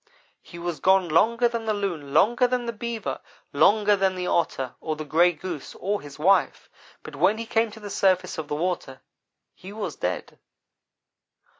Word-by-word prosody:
"He 170 Hz, -, -12 dB
was 170 Hz, -3 st, -4 dB
gone 190 Hz, 0 st, +3 dB
longer 230 Hz, +9 st, +3 dB
than 235 Hz, -1 st, -4 dB
the 215 Hz, -1 st, 0 dB
Loon, 175 Hz, -9 st, -4 dB
longer 240 Hz, -, +4 dB
than 245 Hz, -1 st, -1 dB
the 235 Hz, -, -3 dB
Beaver, 230 Hz, +1 st, -4 dB, 0.3 s
longer 210 Hz, -1 st, +4 dB
than 190 Hz, -1 st, +1 dB
the 180 Hz, 0 st, -3 dB
Otter 135 Hz, -8 st, -1 dB
or 155 Hz, -, -2 dB
the 155 Hz, 0 st, -6 dB
Gray 170 Hz, +4 st, +4 dB
Goose 170 Hz, -2 st, -7 dB
or 200 Hz, +2 st, -2 dB
his 145 Hz, -1 st, -11 dB
wife, 190 Hz, +6 st, +2 dB, 0.3 s
but -, -, -9 dB
when 215 Hz, -, +3 dB
he 230 Hz, -, -5 dB
came 225 Hz, 0 st, +1 dB
to 215 Hz, +1 st, -12 dB
the 205 Hz, -1 st, -8 dB
surface 185 Hz, -3 st, +1 dB
of 155 Hz, -, -5 dB
the 150 Hz, -, -3 dB
water 155 Hz, -5 st, -3 dB, 0.5 s
he 190 Hz, -, -11 dB
was 210 Hz, 0 st, -5 dB
dead. -, -, -4 dB
190 Hz, 180 wpm, -25 LUFS, 165-220 Hz, 0.5 s, longer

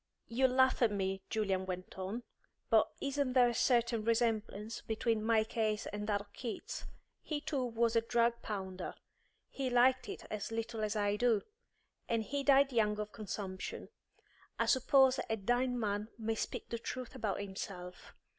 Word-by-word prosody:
"You'll 260 Hz, +3 st, +3 dB
laugh 260 Hz, +1 st, +4 dB
at 230 Hz, -3 st, +5 dB
me," 195 Hz, -1 st, -1 dB
Julian 195 Hz, -4 st, 0 dB
went 185 Hz, 0 st, -5 dB
on, 195 Hz, +6 st, -4 dB, 0.5 s
"but -, -, +5 dB
isn't 275 Hz, -2 st, 0 dB
there 250 Hz, -2 st, +6 dB
a -, -, -1 dB
certain 235 Hz, -2 st, +2 dB
resemblance 225 Hz, -2 st, 0 dB
between 225 Hz, 0 st, 0 dB
my 220 Hz, -1 st, +4 dB
case 220 Hz, -1 st, -1 dB
and 205 Hz, 0 st, -3 dB
that 205 Hz, -2 st, +1 dB
of 205 Hz, 0 st, -16 dB
Keats? 235 Hz, -4 st, -5 dB, 0.4 s
He 305 Hz, -2 st, -3 dB
too 285 Hz, -3 st, -2 dB
was 230 Hz, -1 st, +1 dB
a 230 Hz, -, +5 dB
drug 235 Hz, 0 st, +1 dB
pounder; 190 Hz, -3 st, -5 dB, 0.5 s
he 270 Hz, -2 st, -3 dB
liked 250 Hz, +1 st, +4 dB
it -, -, -6 dB
as 215 Hz, +1 st, -3 dB
little 225 Hz, 0 st, -3 dB
as 215 Hz, 0 st, -1 dB
I 205 Hz, -1 st, +1 dB
do; 230 Hz, -3 st, +3 dB, 0.7 s
and 230 Hz, -1 st, +1 dB
he 280 Hz, +5 st, -2 dB
died 275 Hz, -1 st, +5 dB
young 210 Hz, -2 st, +2 dB
of 210 Hz, 0 st, -3 dB
consumption. 200 Hz, -3 st, -5 dB, 0.7 s
I -, -, +2 dB
suppose 265 Hz, 0 st, +5 dB
a 225 Hz, -, +1 dB
dying 245 Hz, +4 st, +1 dB
man 210 Hz, -1 st, -1 dB
may 225 Hz, -1 st, -1 dB
speak 220 Hz, -, -4 dB
the 235 Hz, -, -3 dB
truth 250 Hz, +1 st, -5 dB
about 210 Hz, -3 st, -2 dB
himself. 190 Hz, -2 st, -7 dB
225 Hz, 165 wpm, -34 LUFS, 205-245 Hz, 0.7 s, there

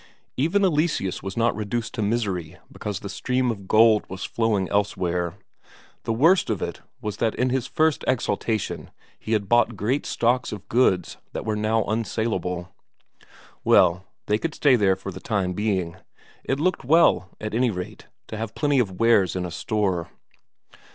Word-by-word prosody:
Even 175 Hz, +9 st, +2 dB
Eleseus 150 Hz, -, 0 dB
was 95 Hz, +2 st, -6 dB
not 115 Hz, 0 st, +2 dB
reduced 110 Hz, +2 st, -3 dB
to 115 Hz, -, -3 dB
misery 100 Hz, -7 st, -1 dB
because 105 Hz, -3 st, -5 dB
the -, -, -6 dB
stream 125 Hz, +4 st, 0 dB
of 100 Hz, -4 st, -8 dB
gold 110 Hz, 0 st, +5 dB
was 95 Hz, 0 st, -6 dB
flowing 110 Hz, -5 st, 0 dB
elsewhere; 90 Hz, -4 st, -1 dB, 0.7 s
the -, -, 0 dB
worst 165 Hz, +11 st, +4 dB
of -, -, 0 dB
it -, -, -5 dB, 0.2 s
was 105 Hz, -1 st, -4 dB
that 115 Hz, -1 st, 0 dB
in 125 Hz, 0 st, +1 dB
his 130 Hz, -1 st, -1 dB
first 155 Hz, +1 st, +1 dB
exaltation 115 Hz, -3 st, -1 dB, 0.3 s
he 110 Hz, -, -3 dB
had 105 Hz, -2 st, 0 dB
bought 120 Hz, +1 st, +3 dB
great 125 Hz, +9 st, -1 dB
stocks 120 Hz, +2 st, +1 dB
of 105 Hz, -3 st, -8 dB
goods 95 Hz, -8 st, +2 dB, 0.2 s
that -, -, -4 dB
were 110 Hz, -1 st, 0 dB
now 110 Hz, +1 st, +1 dB
unsaleable. 100 Hz, -5 st, -2 dB, 0.9 s
Well, 90 Hz, +1 st, +4 dB, 0.2 s
they 105 Hz, +1 st, +1 dB
could 160 Hz, +4 st, -3 dB
stay 140 Hz, -4 st, +4 dB
there 100 Hz, -5 st, +3 dB
for 95 Hz, +1 st, -7 dB
the -, -, -9 dB
time 95 Hz, -5 st, -1 dB
being; 95 Hz, -4 st, -1 dB, 0.5 s
it 135 Hz, -, -1 dB
looked 185 Hz, +1 st, 0 dB
well, 140 Hz, -, +4 dB
at 105 Hz, 0 st, -5 dB
any 125 Hz, +2 st, +2 dB
rate, 100 Hz, +1 st, -6 dB, 0.2 s
to 110 Hz, -, -5 dB
have 110 Hz, 0 st, -5 dB
plenty 145 Hz, -2 st, +2 dB
of 95 Hz, -7 st, -1 dB
wares 115 Hz, -6 st, +4 dB
in 90 Hz, -1 st, -2 dB
a 90 Hz, -, -5 dB
store. 90 Hz, -2 st, -1 dB
110 Hz, 170 wpm, -24 LUFS, 95-120 Hz, 0.9 s, gold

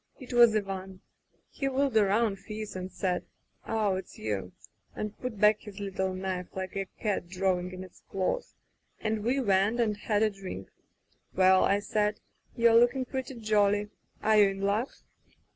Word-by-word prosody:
It 255 Hz, -2 st, -9 dB
was 235 Hz, -2 st, +7 dB
Ivan. 190 Hz, -2 st, -3 dB, 0.5 s
He 275 Hz, -2 st, -2 dB
wheeled 270 Hz, -2 st, 0 dB
around, 210 Hz, 0 st, +3 dB
fierce, 215 Hz, +1 st, -6 dB
then 185 Hz, 0 st, -5 dB
said: 185 Hz, -1 st, -1 dB, 0.4 s
*0h, 210 Hz, -4 st, +1 dB
it's 190 Hz, -, -11 dB
you,' 100 Hz, -4 st, -3 dB, 0.4 s
and 210 Hz, 0 st, -4 dB
put 250 Hz, -5 st, -5 dB
back 210 Hz, +1 st, +5 dB
his 210 Hz, -2 st, -10 dB
little 190 Hz, -1 st, -2 dB
knife, 185 Hz, -1 st, -3 dB
like 190 Hz, 0 st, -5 dB
a 195 Hz, -1 st, -2 dB
cat 205 Hz, -5 st, -1 dB
drawing 180 Hz, -1 st, 0 dB
in 185 Hz, 0 st, -7 dB
its 185 Hz, -, -15 dB
claws, 195 Hz, -, -2 dB, 0.4 s
and 215 Hz, -1 st, -1 dB
we 250 Hz, +5 st, +1 dB
went 205 Hz, 0 st, +2 dB
and 220 Hz, -3 st, +2 dB
had 210 Hz, +1 st, 0 dB
a 215 Hz, -, +3 dB
drink. 190 Hz, -, -8 dB, 0.6 s
'Well,* 185 Hz, 0 st, +5 dB
I 200 Hz, -, +3 dB
said, 210 Hz, 0 st, 0 dB, 0.4 s
'you're 235 Hz, -1 st, +5 dB
looking 250 Hz, +2 st, +3 dB
pretty 260 Hz, 0 st, -5 dB
jolly. 210 Hz, -2 st, +2 dB, 0.3 s
Are 215 Hz, 0 st, +4 dB
you 200 Hz, -, +6 dB
in 195 Hz, 0 st, -5 dB
luck? 205 Hz, +6 st, +1 dB
205 Hz, 165 wpm, -29 LUFS, 190-220 Hz, 0.6 s, was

